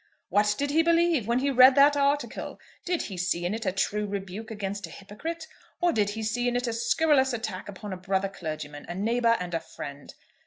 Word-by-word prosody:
"What 210 0 +3
did 285 0 -1
he 320 +2 +4
believe? 335 -7 +2
When 235 +1 +2
he 275 +2 +1
read 255 0 +7
that 285 +1 +6
article, 285 +1 -1 0.3
did 355 -1 0
he 190 - -7
see 175 -1 -1
in 180 - -1
it 225 -2 -4
a - - +3
true 210 +2 -1
rebuke 200 +2 -5
against 200 -3 -4
a - - -14
hypocrite, 315 - -7 0.3
or 350 -1 +2
did 205 -2 +1
he 220 +2 -4
see 240 +3 -1
in 245 - 0
it 245 +1 0
a 235 - -1
scurrilous 265 +2 +2
attack 220 -5 -4
upon 200 0 -7
a - - -5
brother 190 +1 -1
clergyman, 155 -5 -7
a 175 - -4
neighbour, 230 +3 +2
and 180 -1 -5
a 165 - +1
friend? 145 -3 -9
220 Hz, 220 wpm, -27 LUFS, 190-265 Hz, 0.3 s, read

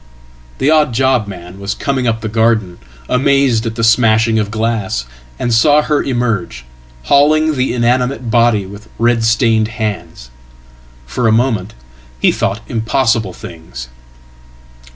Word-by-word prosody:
The 135 +3 +1
odd 150 -6 +2
job 130 -4 +1
man 90 -1 -10
was 100 +1 -3
coming 130 -3 -2
up 110 -1 -1
the 110 - -3
garden, 110 -4 0 0.3
amazed 130 -3 +2
at 110 - -4
the 115 - -3
smashing 115 -1 +3
of 105 -1 -2
glass, 110 - -2 0.3
and 120 - -1
saw 145 +6 +4
her 150 -1 0
emerge, 115 - -2 0.4
hauling 155 - +3
the 130 -2 -1
inanimate 125 0 0
body 115 -3 +2
with 100 +3 -12
red 115 0 +1
stained 110 -1 +2
hands. 105 - -5 0.7
Fora 115 - 0
moment 110 -4 0 0.4
he - - +3
thought 100 +3 -2
impossible 115 -2 0
things." 65 -9 -10
115 Hz, 130 wpm, -15 LUFS, 105-125 Hz, 0.7 s, saw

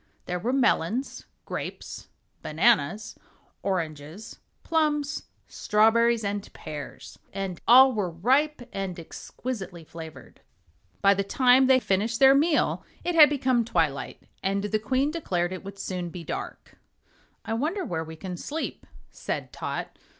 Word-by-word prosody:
There 180 0 -3
were 230 +8 -1
melons, 255 -2 0 0.2
grapes, - - -6 0.3
bananas, 195 +2 +1 0.5
oranges, 165 +1 -4 0.2
plums, 300 -3 0 0.2
strawberries, 225 +2 +3
and 200 0 -3
pears 150 -2 -9
and 195 -3 -4
all 260 +2 +8
were 205 -5 -1
ripe 260 - +1
and 190 -3 -4
exquisitely 190 +1 -7
flavored. 160 0 -11 0.6
By 200 0 +7
the 200 0 -1
time 255 +5 +4
they 260 -1 +6
finished 215 +1 0
their 270 0 +8
meal 300 +3 +2 0.2
it 350 - -1
had 305 -4 +8
become 255 -4 +1
twilight, 165 -10 -1 0.2
and 195 +1 0
the 215 +1 0
Queen 260 +7 0
declared 185 - -1
it 185 - -7
would 195 0 -9
soon 180 -3 -4
be 170 0 -8
dark. - - -7 0.7
"I 225 - -2
wonder 325 - -1
where 160 - -2
we 160 0 -9
can 180 +2 -6
sleep," 310 - -5 0.2
said - - -5
Tot. - - -5
210 Hz, 135 wpm, -26 LUFS, 180-260 Hz, 0.7 s, all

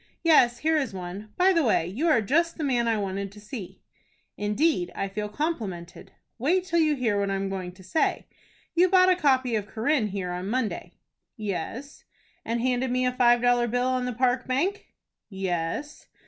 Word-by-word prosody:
"Yes, 250 -8 +5
here 315 +4 +1
is 265 -9 -2
one. 190 +4 -7
By 375 +1 +5
the 335 - +3
way, 215 -9 +2
you 225 - -2
are 245 -9 +4
just 335 +9 +1
the 320 - -3
man 245 -4 +1
I 225 -1 +2
wanted 195 -1 -3
to 210 - -13
see." 210 -2 -9 0.5
"Indeed, 210 - 0
I 195 - -2
feel 210 +2 -4
complimented." 205 - -4 0.3
"Wait 350 +9 +2
till 340 -2 +1
you 305 -2 +3
hear 225 -6 0
what 200 0 0
I 195 - 0
am 195 0 -2
going 185 -2 -4
to 190 +1 -16
say. 185 - 0 0.5
You 360 +2 +4
bought 370 0 +5
a - - +4
copy 260 -7 +2
of 210 -2 -1
'Corinne' 230 +2 0
here 190 -3 -4
on 180 +2 -4
Monday?" 245 -1 -2 0.4
"Yes." 215 - -5 0.4
"And 230 +1 -2
handed 255 +1 0
me 255 +1 +1
a 250 - +2
five 240 -1 +3
dollar 245 -1 +3
bill 245 +2 0
on 255 -1 0
the 250 - -2
Park 250 +1 +1
Bank?" 335 +11 -1 0.4
"Yes." 190 - -3
240 Hz, 190 wpm, -26 LUFS, 200-290 Hz, 0.5 s, Yes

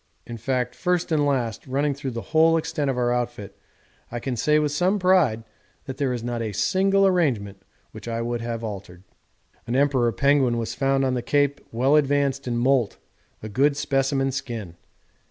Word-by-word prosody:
In 120 - -7
fact 125 +2 -2
first 180 -1 -1
and 150 -2 +2
last, 120 -6 -2
running 140 +2 0
through 140 0 -5
the 115 -2 -5
whole 165 +1 +5
extent 160 -3 -2
of 130 - -1
our 120 -1 +1
outfit, 120 -5 -4 0.6
I 120 - -3
can 125 +1 -3
say 150 +6 +2
with 150 -1 +1
some 180 +7 +1
pride 180 - +3 0.4
that 130 -1 -6
there 140 -2 0
is 120 -2 -3
not 120 -1 -3
a 110 -2 -3
single 195 - +2
arrangement 120 - 0 0.3
which - - -11
I 115 0 -2
would 120 0 -2
have 115 -1 -4
had - - -5
altered.' 95 -3 -9 0.6
An 120 - -1
Emperor 135 -4 +2
penguin 140 -2 +2
was 115 -1 -3
found 135 0 +1
on 130 - 0
the 125 - -1
Cape 145 +2 +1
well 130 +5 +2
advanced 140 -2 +1
in 120 -1 -1
moult, 125 -3 +1 0.5
a - - -4
good 140 +7 +1
specimen 135 -1 0
skin. 115 -9 -5
135 Hz, 190 wpm, -24 LUFS, 120-145 Hz, 0.6 s, whole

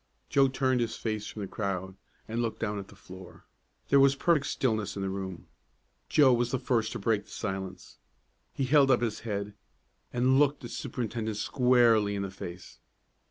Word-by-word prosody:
Joe 135 -1 +4
turned 130 -1 +1
his 115 - -2
face 110 -2 -3
from 105 - -6
the - - -4
crowd, 95 -2 -3 0.3
and 115 +2 -2
looked 115 -2 -3
down 105 -2 -2
at 100 - -8
the - - -16
floor. 95 0 -13 0.4
There 140 - +6
was 135 0 +5
perfect 150 -1 +2
stillness 110 -5 -1
in 100 - -3
the 95 - -2
room. 95 -3 -6 0.6
Joe 140 -4 +6
was 120 0 +1
the 130 - 0
first 115 -3 0
to - - -3
break 105 -3 0
the - - -22
silence. 95 -3 -6 0.5
He 135 - -3
held 140 +1 +5
up 125 -2 +4
his 115 -3 -1
head, 105 -2 -4 0.6
and 130 +2 +3
looked 145 0 +2
the 120 - -7
superintendent 115 -3 -4
squarely 120 -5 +3
in 100 - -2
the 95 - -5
face. 90 -2 -9
115 Hz, 185 wpm, -29 LUFS, 100-130 Hz, 0.6 s, There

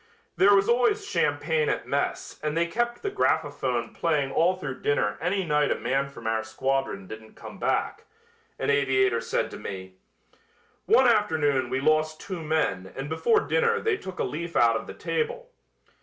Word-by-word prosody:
"There 200 +2 +6
was 195 0 +3
always 250 - +2
champagne 470 +1 +1
at 420 - -2
mess - - -2
and 150 +1 -2
they 170 - +3
kept 240 +7 -2
the 405 - -1
graphophone 130 - 0
playing 150 -5 0
all 175 +6 +3
through 150 -8 -6
dinner 105 -8 +1
any 190 +3 0
night 150 -2 +2
a - - +2
man 140 +1 -1
from 140 - -12
our 110 0 0
squadron 130 -2 -2
didn't 110 +2 -11
come - - -11
back," - - -1 0.5
an - - 0
aviator 130 -4 +2
said - - -1
to - - -7
me. 95 -1 -7 0.9
"One - - +5
afternoon 145 -4 +2
we 130 - -1
lost 155 +1 +2
two 185 -4 -6
men 100 - -1
and 135 +2 -5
before 430 - +2
dinner 465 -2 +1
they 445 -3 +1
took 190 - -8
a - - 0
leaf 170 +3 -4
out 115 -1 +4
of 110 - -4
the - - -8
table. - - -3
150 Hz, 175 wpm, -26 LUFS, 130-195 Hz, 0.9 s, There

